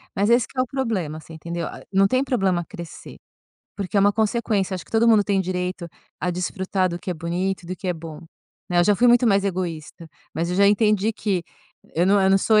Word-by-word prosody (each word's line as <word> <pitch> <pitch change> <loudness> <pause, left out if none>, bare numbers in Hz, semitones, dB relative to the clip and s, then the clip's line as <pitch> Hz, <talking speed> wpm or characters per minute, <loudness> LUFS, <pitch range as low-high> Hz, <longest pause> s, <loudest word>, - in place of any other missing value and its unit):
Mas 205 +1 +1
esse 240 0 +4
que - - -20
é 255 - +4
o - - 0
problema, 215 - -2
você 160 - -13
entendeu? 170 +2 -5
A - - -9
não 195 0 +4
tem 255 +6 +1
problema 195 -9 0
crescer, 170 0 -10 0.6
porque 200 0 -3
é - - +5
uma 205 +1 +4
consequência, 215 -3 0
acho 180 - -8
que - - -22
todo 225 +1 +3
mundo 215 -3 +5
tem 200 -2 +1
o - - 0
direito 180 -1 -3 0.3
a 180 - 0
desfrutar 185 +1 -1
do 175 0 -4
que - - -5
é - - -2
bonito, 175 +3 -3
do 185 - -4
que 185 +1 -6
é - - +2
bom, 160 -2 -9 0.5
né. 175 - +2
Eu 175 - +5
já 210 - +4
fui 245 +6 +4
muito 240 +1 +5
mais 200 -2 +3
egoísta, 170 -4 -4 0.3
mas 170 +2 -2
eu 180 - -2
já 200 +1 +5
entendi 210 0 +2
que 195 -5 -1 0.5
eu 175 +2 +3
não 200 +1 +4
eu 190 - +4
não 195 - +5
sou 215 +2 +4
190 Hz, 245 wpm, -23 LUFS, 175-210 Hz, 0.6 s, é